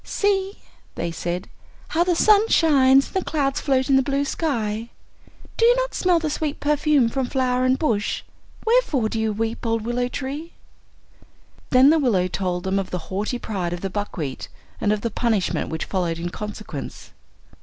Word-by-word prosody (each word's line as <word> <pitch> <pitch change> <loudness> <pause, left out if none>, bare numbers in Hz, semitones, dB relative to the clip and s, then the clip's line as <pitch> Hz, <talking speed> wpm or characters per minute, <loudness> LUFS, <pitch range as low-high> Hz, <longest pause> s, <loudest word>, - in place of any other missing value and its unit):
"See," 395 -1 0 0.4
they 170 - -3
said, 175 +2 -4 0.4
"how 335 - +2
the 355 -1 +1
sun 425 +4 +5
shines, 275 -4 +5
and - - -13
the 380 - 0
clouds 275 -3 -1
float 265 -2 +1
in 270 -2 +4
the - - +5
blue 280 +1 0
sky. 230 -8 -2 0.7
Do - - +1
you 480 +1 +6
not - - -1
smell 360 -1 +2
the 325 -1 -1
sweet 295 -1 -2
perfume 295 -3 +2
from 260 +2 -2
flower 255 -1 +1
and 255 +1 +3
bush? 220 -10 -1 0.4
Wherefore 445 - +2
do 225 - -3
you 220 0 0
weep, 225 +2 -3
old 225 -2 0
willow 240 +2 -1
tree?" 285 +6 -5 1.2
Then 260 +3 +6
the 320 - +4
willow 205 -10 +2
told 180 -1 -2
them 190 +1 0
of 195 - -4
the 180 +1 -6
haughty 210 +6 -1
pride 185 -7 -3
of 175 - -5
the 195 - -3
buckwheat, 175 -9 -4 0.3
and 205 - +2
of 210 -1 0
the 230 - -2
punishment 220 -5 0
which 160 - -3
followed 175 -4 -1
in 170 +1 -3
consequence. 210 -8 -7
250 Hz, 180 wpm, -23 LUFS, 205-295 Hz, 1.2 s, you